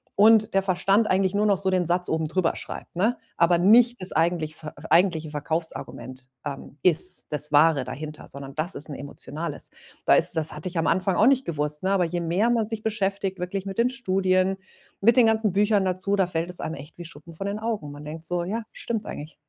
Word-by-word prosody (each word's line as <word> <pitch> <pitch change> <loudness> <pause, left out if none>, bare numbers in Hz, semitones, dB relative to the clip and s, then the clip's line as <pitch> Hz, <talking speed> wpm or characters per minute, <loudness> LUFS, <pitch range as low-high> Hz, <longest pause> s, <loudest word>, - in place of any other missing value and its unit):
und 220 +1 +5
der 195 - +3
Verstand 195 +3 +2
eigentlich 190 0 +2
nur 210 +1 +2
noch 200 -2 +3
so 190 -1 0
den 180 -2 +1
Satz 180 +1 0
oben 160 -1 -1
drüber 170 +2 0
schreibt, - - -9
ne? 220 +7 +1 0.2
Aber 170 +1 +4
nicht 235 +6 +5
das 185 - +3
eigentlich 160 -1 0
ve 150 - -6 0.2
eigentliche 165 -4 +3
Verkaufsargument, 150 -4 -5 0.2
ähm, 140 0 -7
ist, 180 +1 +5
das 150 0 -1
Wahre 150 -3 +4
dahinter, 150 +4 -8
sondern 140 0 -9
das 160 +5 -2
ist 145 - -4
'n 145 - -6
emotionales. 150 +2 -6 0.3
Da - - +5
ist - - +3
das 155 -1 0
hatte 150 +4 -7
ich 175 - -6
am 165 - +1
Anfang 185 +1 +1
auch 215 - +5
nicht 270 -1 +3
gewusst, 150 -2 -1
ne, 190 - +1
aber 195 -2 +2
je 175 +1 -3
mehr 180 +8 +1
man 230 -2 +1
sich 220 -1 -5
beschäftigt 200 -3 -2
wirklich 185 +2 -4
mit 195 +2 -6
den 240 +2 +3
Studien, 190 -6 0 0.4
mit 235 +5 +4
den 245 - +7
ganzen 220 -2 +2
Büchern 205 0 +2
dazu, 185 +2 +1
da 190 -2 +1
fällt 170 0 -2
es 180 - -6
einem 160 - -4
echt 145 +4 -12
wie 175 - -7
Schuppen 165 0 -11
von 195 +4 -5
den 205 +1 -3
Augen. 220 -9 -3
Man 145 +1 -10
denkt 160 +2 -7
so: 175 +1 -1
„Ja, 215 +6 -3
stimmt 225 -3 -4
eigentlich.“ 150 +1 -8
180 Hz, 220 wpm, -24 LUFS, 160-200 Hz, 0.4 s, den